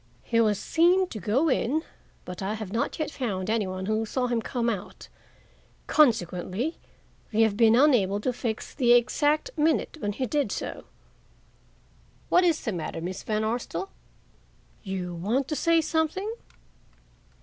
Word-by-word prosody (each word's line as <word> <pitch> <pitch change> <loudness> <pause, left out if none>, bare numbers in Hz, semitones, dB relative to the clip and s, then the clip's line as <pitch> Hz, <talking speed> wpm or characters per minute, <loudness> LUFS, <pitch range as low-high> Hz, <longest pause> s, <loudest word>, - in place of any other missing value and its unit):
"He 230 -1 +2
was 210 -3 +2
seen 355 +3 +3
to 215 - -6
go 230 - +1
in, 290 +2 +1 0.4
but 180 0 -7
I 200 +3 -2
have 215 -3 -6
not 230 +2 -1
yet 310 -1 -2
found 215 -8 -3
any 220 -3 +1
one 185 0 -4
who 215 +2 0
saw 250 +3 -1
him 240 -2 0
come 240 0 -2
out; 205 -4 -4 0.8
consequently 220 - +1 0.5
we 225 +1 +4
have 220 -2 +2
been 225 +1 +5
unable 235 -8 +4
to 255 +3 -1
fix 230 -2 -4
the 240 -4 +4
exact 290 - +2
minute 315 +1 +1
when 205 -5 -2
he 260 +5 -2
did 280 -4 0
so. - - -5 1.4
What 360 - +5
is 335 -4 +1
the 225 - 0
matter, 165 -3 -4
Miss 180 +3 -5
Van 215 0 -1
Arsdale? 240 - -3 0.9
You 190 -3 -4
want 220 +11 -1
to 305 - -1
say 335 +1 +3
something?" 320 +7 -1
230 Hz, 155 wpm, -26 LUFS, 205-300 Hz, 1.4 s, been